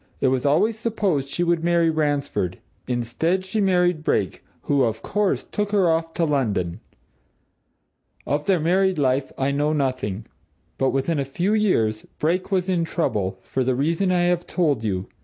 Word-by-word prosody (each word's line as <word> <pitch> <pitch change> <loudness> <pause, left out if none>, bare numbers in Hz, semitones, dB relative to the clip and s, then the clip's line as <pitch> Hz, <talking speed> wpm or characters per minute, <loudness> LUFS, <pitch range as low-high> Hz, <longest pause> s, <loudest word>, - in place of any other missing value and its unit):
It 130 - +3
was 130 +1 0
always 210 +10 +2
supposed 200 - -1
she 175 - -1
would 170 -1 +1
marry 170 -1 +3
Ransford; 145 - -1 0.3
instead, 125 +10 -1
she 210 +3 -1
married 180 -4 +2
Brake, - - -1 0.2
who, 140 -1 +2
of 110 -3 0
course, 205 -1 0
took 210 0 -3
her 195 -4 +4
off 165 0 -1
to 170 - +1
London. 105 - -1 1.5
Of 145 +1 -1
their 190 -3 +3
married 185 +3 +2
life, 135 -1 +1
I 135 +1 0
know 145 +2 +1
nothing. 130 -8 -2 0.5
But 135 - +3
within 140 +4 0
a - - +1
few 175 +9 -1
years, 115 - +2 0.2
Brake 180 +6 -1
was 185 -1 +1
in 180 -3 +1
trouble, 100 - -1
for 130 - -1
the 130 0 +1
reason 165 +8 +1
I 180 -1 +2
have 175 0 +1
told 150 - 0
you. 95 -3 -1
155 Hz, 170 wpm, -23 LUFS, 130-180 Hz, 1.5 s, her